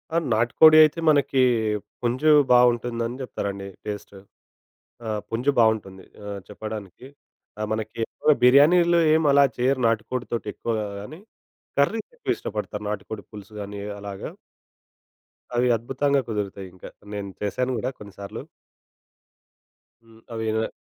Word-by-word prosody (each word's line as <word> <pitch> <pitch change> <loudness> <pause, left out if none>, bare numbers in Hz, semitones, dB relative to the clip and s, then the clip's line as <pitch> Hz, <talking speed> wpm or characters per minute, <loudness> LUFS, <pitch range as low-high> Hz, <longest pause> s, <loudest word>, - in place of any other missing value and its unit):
ఆ! - - +4 0.2
నాటికోడి 120 +8 +6
అయితే 155 +2 +2
మనకి 140 -3 +3 0.6
పుంజు 125 +6 +2 0.2
బా 125 - +8
ఉంటుందని 120 0 -4
చెప్తారండి 100 -6 -5 0.2
టేస్ట్. 105 -1 -6 0.9
ఆ! - - -2 0.2
పుంజు 120 +5 +1
బావుంటుంది 105 -4 +1 0.2
ఆహ్, 100 -1 -6
చెప్పడానికి. 110 +1 -8 0.5
ఆ! - - -3
మనకెక్కువగా 110 +6 0
బిర్యానీలో 170 +7 +6
ఏం 160 0 +3
అలా 140 0 +6
చేయరు 130 +1 +1
నాటుకోడితోటెక్కువగా 115 -1 -2
గాని, 150 - -9 0.6
కర్రీస్ 215 +10 +1
ఎక్కువ 485 - -2
ఇష్టపడతారు 105 0 -5
నాటికోడి 105 -1 -6
పులుసు 105 0 -11
గాని 100 0 -7 0.2
అలాగా. 100 -1 -7 1.2
అవి 125 +1 +2
అద్భుతంగా 135 +4 0
కుదురుతాయి 100 -3 -4
ఇంకా. 90 - -11 0.2
నేను 100 -1 -5
చేశాను 125 +5 -1
గూడా 120 +3 -2
కొన్నిసార్లు. 100 -1 -9 1.6
హ్మ్. 115 0 -20
అవినన 110 0 -1
115 Hz, 110 wpm, -24 LUFS, 105-130 Hz, 1.6 s, బా